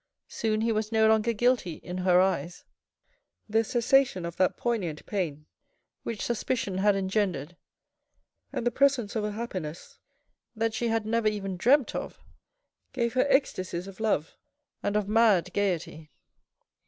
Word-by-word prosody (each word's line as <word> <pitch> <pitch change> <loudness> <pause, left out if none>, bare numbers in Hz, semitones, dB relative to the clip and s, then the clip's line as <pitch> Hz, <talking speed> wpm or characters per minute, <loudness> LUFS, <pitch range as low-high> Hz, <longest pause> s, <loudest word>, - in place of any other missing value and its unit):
Soon 215 -1 -1
he 230 +1 +1
was 215 0 -1
no 220 -1 +4
longer 220 +1 +3
guilty 235 -5 +1
in 180 +3 -7
her 180 -1 +4
eyes. 180 -3 0 0.8
The 225 +1 +2
cessation 240 -5 +2
of 170 0 -5
that 185 -1 +2
poignant 190 -11 -2
pain 160 -7 -3 0.6
which 225 -3 -4
suspicion 230 -5 -2
had 205 +1 +4
engendered 190 -5 -1 1.0
and - - -3
the 240 - +2
presence 255 -5 +2
of 220 - 0
a 210 0 -2
happiness 185 -8 -6 0.6
that 225 0 0
she 235 +2 -1
had 225 -1 0
never 225 0 +1
even 200 -3 -2
dreamt 255 +8 +3
of, - - -5 0.7
gave 235 -3 -1
her 255 +2 +2
ecstasies 185 -10 0
of 195 0 -11
love 210 -8 0 0.5
and 205 - -1
of 210 -2 +1
mad 210 -5 +3
gaiety. 170 -6 -2
210 Hz, 145 wpm, -28 LUFS, 185-230 Hz, 1.0 s, no